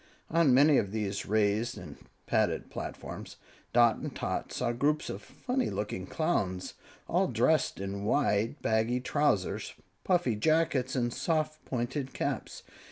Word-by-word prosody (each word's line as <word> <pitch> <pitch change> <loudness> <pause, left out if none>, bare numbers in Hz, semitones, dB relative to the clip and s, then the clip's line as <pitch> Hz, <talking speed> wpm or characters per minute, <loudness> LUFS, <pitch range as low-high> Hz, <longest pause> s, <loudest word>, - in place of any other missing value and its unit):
On 165 -3 +4
many 140 +3 +6
of 100 - -1
these 105 -2 -2
raised 110 +3 +1
and 75 -5 -9 0.3
padded - - 0
platforms, - - -7 0.4
Dot 120 -2 +5
and - - -6
Tot - - -3
saw 120 - -1
groups 145 +6 0
of 100 - -6
funny 250 - -2
looking 95 -3 -4
Clowns, 100 - -1 0.3
all - - +2
dressed - - +2
in 100 +1 -4
wide, 115 +1 +1
baggy 110 +3 +2
trousers, 130 -7 0 0.3
puffy 175 - +2
jackets 145 0 +1
and 120 -2 0
soft, 155 -2 -1
pointed 130 +2 -3
caps. - - -3
120 Hz, 135 wpm, -30 LUFS, 105-150 Hz, 0.4 s, many